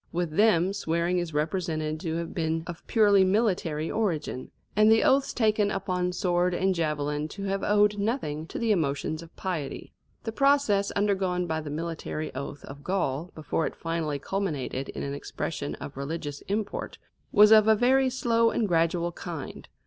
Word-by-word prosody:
With 175 Hz, -2 st, -1 dB
them 195 Hz, -3 st, +4 dB
swearing 170 Hz, -2 st, 0 dB
is 175 Hz, -2 st, -3 dB
represented 155 Hz, 0 st, -1 dB
to 160 Hz, 0 st, -3 dB
have 170 Hz, 0 st, -4 dB
been 160 Hz, -1 st, -1 dB
of 175 Hz, -1 st, -7 dB
purely 205 Hz, -4 st, +5 dB
military 185 Hz, -6 st, +1 dB
origin, 170 Hz, -, -2 dB, 0.3 s
and 215 Hz, +1 st, +6 dB
the 225 Hz, -, +5 dB
oaths 270 Hz, +1 st, +3 dB
taken 215 Hz, -3 st, +2 dB
upon 180 Hz, -2 st, -1 dB
sword 180 Hz, 0 st, +1 dB
and 190 Hz, +1 st, +2 dB
javelin 150 Hz, -3 st, -1 dB
to 195 Hz, +5 st, -8 dB
have 195 Hz, 0 st, -1 dB
owed 205 Hz, 0 st, +3 dB
nothing 180 Hz, -, -2 dB
to -, -, -6 dB
the 230 Hz, -2 st, +1 dB
emotions 155 Hz, -3 st, 0 dB
of 165 Hz, 0 st, -14 dB
piety. 170 Hz, -7 st, -4 dB, 0.3 s
The 225 Hz, -, -3 dB
process 275 Hz, -6 st, +3 dB
undergone 190 Hz, -3 st, +1 dB
by 160 Hz, -1 st, -2 dB
the 150 Hz, -, -7 dB
military 155 Hz, 0 st, -4 dB
oath 140 Hz, +1 st, -6 dB
of 140 Hz, +1 st, -10 dB
Gaul 175 Hz, -3 st, -1 dB
before 155 Hz, +1 st, -1 dB
it -, -, -7 dB
finally 165 Hz, -3 st, -2 dB
culminated 145 Hz, -5 st, -3 dB
in -, -, -5 dB
an 140 Hz, -, -3 dB
expression 145 Hz, +1 st, -4 dB
of 140 Hz, -, -8 dB
religious 145 Hz, +1 st, -5 dB
import, 205 Hz, +2 st, -3 dB, 0.3 s
was 210 Hz, 0 st, +7 dB
of 215 Hz, -1 st, +7 dB
a 220 Hz, -, +6 dB
very 260 Hz, +4 st, +3 dB
slow 230 Hz, -2 st, +2 dB
and 225 Hz, -2 st, 0 dB
gradual 170 Hz, 0 st, +1 dB
kind. 165 Hz, -4 st, -7 dB
175 Hz, 170 wpm, -27 LUFS, 155-205 Hz, 0.3 s, was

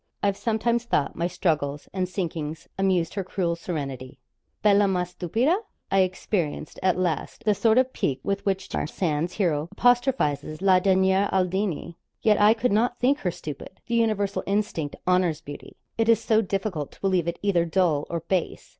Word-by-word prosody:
I've 200 Hz, -1 st, +2 dB
sometimes 235 Hz, +2 st, 0 dB
thought 145 Hz, -11 st, 0 dB
my 170 Hz, -, 0 dB
struggles 155 Hz, -5 st, -1 dB
and 185 Hz, -1 st, -1 dB
sinkings 165 Hz, -4 st, -4 dB
amused 185 Hz, -3 st, +1 dB
her 195 Hz, -, -2 dB
cruel 175 Hz, -2 st, -1 dB
serenity. 140 Hz, -6 st, -5 dB, 0.5 s
Bella 205 Hz, -1 st, +5 dB
ma 180 Hz, -2 st, +1 dB
stupida! 205 Hz, -, 0 dB, 0.4 s
I 195 Hz, -, +4 dB
experienced, 185 Hz, -4 st, -1 dB
at 185 Hz, -1 st, +2 dB
last, 180 Hz, +3 st, -2 dB
the 210 Hz, -, +4 dB
sort 220 Hz, +3 st, +3 dB
of 255 Hz, 0 st, +3 dB
pique 135 Hz, -2 st, -1 dB
with 200 Hz, 0 st, -2 dB
which 195 Hz, -2 st, -1 dB
George -, -, -3 dB
Sand's 165 Hz, -1 st, -1 dB
hero 165 Hz, -5 st, 0 dB
apostrophises 230 Hz, -, +1 dB
la 190 Hz, -2 st, +5 dB
derniere 190 Hz, +1 st, +3 dB
Aldini. 185 Hz, -2 st, -1 dB, 0.3 s
Yet 210 Hz, -2 st, +4 dB
I 210 Hz, +2 st, +6 dB
could 250 Hz, 0 st, 0 dB
not 240 Hz, +4 st, +2 dB
think 275 Hz, +4 st, +2 dB
her 180 Hz, -, -1 dB
stupid. 155 Hz, -5 st, -8 dB
The 235 Hz, -, -5 dB
universal 215 Hz, -4 st, +1 dB
instinct 195 Hz, -7 st, -1 dB
honours 180 Hz, -4 st, +2 dB
beauty. 145 Hz, 0 st, -10 dB, 0.2 s
It 225 Hz, 0 st, +2 dB
is 225 Hz, -2 st, +5 dB
so 225 Hz, -1 st, +2 dB
difficult 195 Hz, -7 st, -3 dB
to -, -, -21 dB
believe 185 Hz, -4 st, +1 dB
it 170 Hz, -, -2 dB
either 190 Hz, -4 st, +3 dB
dull 165 Hz, -4 st, +1 dB
or 170 Hz, -1 st, -2 dB
base. 175 Hz, +1 st, -2 dB
185 Hz, 170 wpm, -25 LUFS, 165-205 Hz, 0.5 s, I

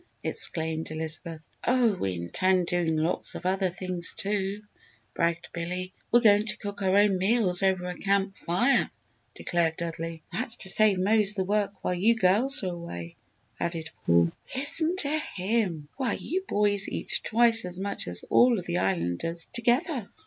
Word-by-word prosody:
exclaimed 160 Hz, 0 st, 0 dB
Elizabeth. 160 Hz, +1 st, -3 dB, 0.2 s
"Oh 245 Hz, -3 st, +3 dB
we 95 Hz, -, -2 dB
intend 180 Hz, -, +1 dB
doing 170 Hz, -2 st, 0 dB
lots 160 Hz, +3 st, 0 dB
of -, -, -8 dB
other 190 Hz, 0 st, +1 dB
things, 180 Hz, -1 st, -3 dB
too," 200 Hz, 0 st, -2 dB, 0.5 s
bragged 170 Hz, 0 st, -1 dB
Billy. 180 Hz, +2 st, -4 dB, 0.2 s
"We're 240 Hz, -, +5 dB
going 210 Hz, -1 st, +4 dB
to 210 Hz, -1 st, +4 dB
cook 205 Hz, -2 st, -7 dB
our 190 Hz, 0 st, +2 dB
own 200 Hz, -2 st, +4 dB
meals 195 Hz, -2 st, +2 dB
over 190 Hz, -2 st, +1 dB
a 180 Hz, 0 st, -4 dB
camp 195 Hz, 0 st, 0 dB
fire!" 200 Hz, +12 st, +1 dB, 0.5 s
declared 165 Hz, -2 st, 0 dB
Dudley. 165 Hz, -1 st, -5 dB
"That's 230 Hz, +4 st, -3 dB
to 190 Hz, -, -5 dB
save 210 Hz, -1 st, +3 dB
Mose 210 Hz, +2 st, +3 dB
the 190 Hz, -, 0 dB
work 205 Hz, +1 st, -1 dB
while 180 Hz, -, 0 dB
you 210 Hz, +6 st, +3 dB
girls 225 Hz, +7 st, +3 dB
are 180 Hz, -2 st, -2 dB
away!" 85 Hz, -, -8 dB, 0.4 s
added 165 Hz, -2 st, -3 dB
Paul. 85 Hz, 0 st, +3 dB, 0.2 s
"Listen 315 Hz, +5 st, +2 dB
to 310 Hz, -3 st, 0 dB, 0.2 s
him! 185 Hz, -6 st, -1 dB
Why, 260 Hz, -4 st, 0 dB
you 375 Hz, +4 st, -3 dB
boys 205 Hz, -1 st, +1 dB
eat -, -, -2 dB
twice 230 Hz, 0 st, +3 dB
as 180 Hz, 0 st, -6 dB
much 200 Hz, +1 st, -3 dB
as 90 Hz, 0 st, -6 dB
all 245 Hz, -1 st, +5 dB
of 180 Hz, -, -5 dB
the 90 Hz, -, -1 dB
Islanders 95 Hz, -, -2 dB
together!" 245 Hz, -, 0 dB
190 Hz, 165 wpm, -27 LUFS, 170-215 Hz, 0.5 s, We're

